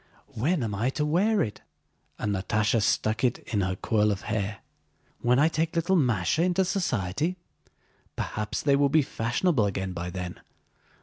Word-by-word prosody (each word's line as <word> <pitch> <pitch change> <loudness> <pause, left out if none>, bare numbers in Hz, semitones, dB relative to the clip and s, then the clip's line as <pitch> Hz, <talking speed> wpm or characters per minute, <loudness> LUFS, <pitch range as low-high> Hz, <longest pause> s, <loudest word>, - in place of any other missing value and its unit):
"When 145 +6 0
am 110 -2 -2
I 110 +6 0
to 150 - +1
wear 200 +8 +2
it?" 105 -2 -6 0.6
and 105 -1 -1
Natásha 105 +4 +1
stuck 110 +2 +1
it 125 -2 +2 0.2
in 105 - +2
her 95 0 -1
coil 105 +1 +1
of 100 - -3
hair. 100 -1 -3 0.6
"When 125 +1 +3
I 150 +3 +5
take 160 0 -1
little 170 +3 +2
Másha 120 - +2
into 185 +1 +2
society? 170 - -1 0.8
Perhaps 105 0 -3
they 140 -1 +4
will 140 0 +3
be 155 +1 +4
fashionable 120 - +1
again 95 -1 -3
by 90 +1 -4
then. 90 0 -6
115 Hz, 165 wpm, -27 LUFS, 100-155 Hz, 0.8 s, I